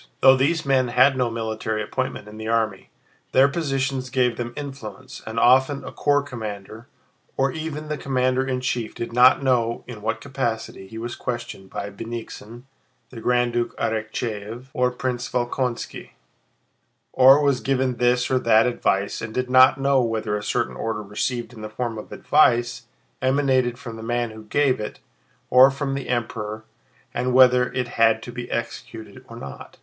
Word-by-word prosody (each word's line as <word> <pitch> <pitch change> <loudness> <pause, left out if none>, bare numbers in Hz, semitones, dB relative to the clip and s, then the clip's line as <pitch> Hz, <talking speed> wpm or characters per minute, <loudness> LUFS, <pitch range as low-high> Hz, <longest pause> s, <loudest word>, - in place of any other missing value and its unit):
Though 130 0 +8
these 150 +5 +1
men 130 -2 +3
had 130 +3 +4
no 125 -2 +1
military 110 -1 -3
appointment 130 0 -4
in 105 +1 -11
the 110 0 -6
army, 110 -4 -1 0.4
their 135 +1 +6
position 135 -3 -1
gave 125 -2 +2
them 120 0 -4
influence, 130 -3 -8
and 110 +1 -2
often 130 +4 +4
a - - -7
corps 145 -1 +1
commander, 110 -3 -7 0.5
or 135 0 +2
even 155 0 -5
the 150 -1 -3
commander 130 -1 +1
in 130 -1 -2
chief, 120 -3 -2
did 115 0 -5
not 125 +3 +6
know 120 -3 +1
in 120 -4 -9
what 110 +2 -2
capacity 120 -7 -4
he 110 - -10
was 120 +1 -5
questioned 120 -6 -6
by 100 0 -5
Bennigsen, 115 +2 -8 0.5
the 115 -3 -9
Grand 120 0 +1
Duke, 120 0 -2
Arakchéev, 110 +2 -3
or 125 0 +2
Prince 125 0 -3
Volkónski, 125 0 -3 1.0
or 135 +2 +7
was 140 -3 +2
given 130 -2 0
this 125 +1 +2
or 130 - +3
that 115 -2 +4
advice 100 -5 0
and 110 - -5
did 125 0 -2
not 130 +1 +6
know 135 -1 +3
whether 115 -3 -1
a 105 - -3
certain 105 - -1
order 110 -1 -3
received 120 +4 -3
in 110 - -11
the 110 - -6
form 115 0 -4
of - - -11
advice 120 -4 +2 0.3
emanated 130 -2 +2
from 120 -3 -8
the - - -8
man 120 0 -1
who 110 0 -11
gave 135 +2 +1
it 105 - -5 0.5
or 130 +2 +8
from 140 0 -3
the 135 -1 -5
Emperor 110 -3 -3 0.5
and 125 +1 -1
whether 125 -1 +6
it 125 -1 -1
had 115 0 +4
to 120 - -7
be 120 0 -7
executed 120 +1 -6
or 115 - -9
not. 70 - -10
125 Hz, 170 wpm, -23 LUFS, 115-130 Hz, 1.0 s, Though